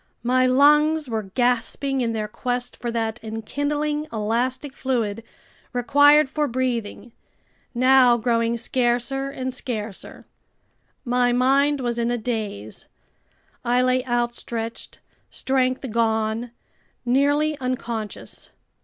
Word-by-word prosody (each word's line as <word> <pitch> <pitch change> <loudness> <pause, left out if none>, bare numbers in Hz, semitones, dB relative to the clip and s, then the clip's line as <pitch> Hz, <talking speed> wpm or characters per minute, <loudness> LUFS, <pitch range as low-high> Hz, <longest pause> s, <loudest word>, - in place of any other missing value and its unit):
My 255 +1 +3
lungs 295 +3 +4
were 220 -4 -4
gasping 250 +2 +1
in 235 -2 0
their 215 -1 -2
quest 245 +2 -3
for 240 - -5
that 225 -1 -3
enkindling 290 +7 -2
elastic 240 +5 -2
fluid 230 -5 -2 0.5
required 285 +4 +5
for 300 +2 -1
breathing, 240 -2 -3 0.6
now 255 -1 +5
growing 230 0 0
scarcer 245 +3 -1
and 260 -2 -4
scarcer. 220 -5 -5 0.8
My 245 0 +2
mind 275 +3 +3
was 240 -1 -2
in 235 0 0
a 240 - 0
daze. 215 - -5 0.8
I 245 +1 +2
lay 255 0 +2
outstretched, 240 -1 -3 0.3
strength 260 0 -1
gone, 220 +1 0 0.6
nearly 290 +4 +2
unconscious. 235 -4 -5
245 Hz, 105 wpm, -23 LUFS, 230-265 Hz, 0.8 s, required